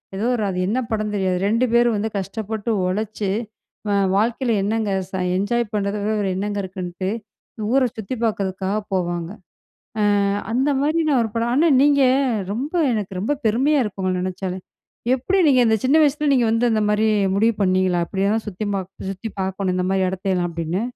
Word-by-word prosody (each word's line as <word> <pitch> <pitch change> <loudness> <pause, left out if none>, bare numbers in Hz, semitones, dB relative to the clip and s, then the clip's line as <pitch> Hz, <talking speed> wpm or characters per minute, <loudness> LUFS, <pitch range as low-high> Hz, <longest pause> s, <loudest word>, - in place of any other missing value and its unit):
எதோ 205 - -2
ஒரு 220 - -1
அது 180 - -3
என்ன 240 +5 0
படம்ன்னு 215 -1 -2
தெரியாது. 185 -2 0
2 230 +4 +2
பேரும் 240 -2 +4
வந்து 220 +2 -1
கஷ்டப்பட்டு 215 +3 -4 0.2
உழைச்சு, 210 +1 -2 0.6
அ - - +2 0.2
வாழ்க்கையில 235 +2 +1
என்னங்க 215 0 0 0.2
ச - - -37 0.2
என்ஜாய் 220 +2 0
பண்றத 200 0 -1
விட 215 +1 0
வேற 200 - 0
என்னங்க 205 +1 -2
இருக்குன்ட்டு, 185 0 -5 0.6
ஊரை 260 -1 +4
சுத்திப் 225 +3 -4
பார்க்கிறதுக்காக 195 -1 -1
போவாங்க. 175 -2 -1 0.7
அ - - +3 0.5
அந்த 265 +4 +2
மாரி 310 +3 +1
நா 275 - +3
1 220 - -3
படம் 230 +1 0
ஆனா, 325 +5 +4
நீங்க 285 -1 +4 0.5
ரொம்ப 275 - -4 0.2
எனக்கு 195 -3 -3
ரொம்ப 220 - -1 0.2
பெருமையா 270 +6 +2
இருக்கு 205 -3 -5
உங்கள 185 0 0
நெனைச்சாலே. 185 0 -4 0.6
எப்படி 370 +10 0
நீங்க 260 -3 +5
இந்த 220 - +4
சின்ன 270 +4 +4
வயசுல 300 +1 +2
நீங்க 245 -3 +3
வந்து 230 +2 +2
இந்த 215 - +1
மாரி 210 +1 +2 0.3
முடிவு 225 +3 +3
பண்ணீங்களா? 185 -2 +2
"இப்படியெல்லாம் 200 +3 0
சுத்தி 210 +1 -4
மாக் 190 -1 -4 0.2
சுத்தி 195 +4 -6
பார்க்கணும் 190 0 -1
இந்த 180 0 0
மாரி 190 -1 +2
இடத்தயல்லாம்." 185 -2 -1
அப்படீன்னு. 170 +5 -2
210 Hz, 170 wpm, -21 LUFS, 190-235 Hz, 0.7 s, நீங்க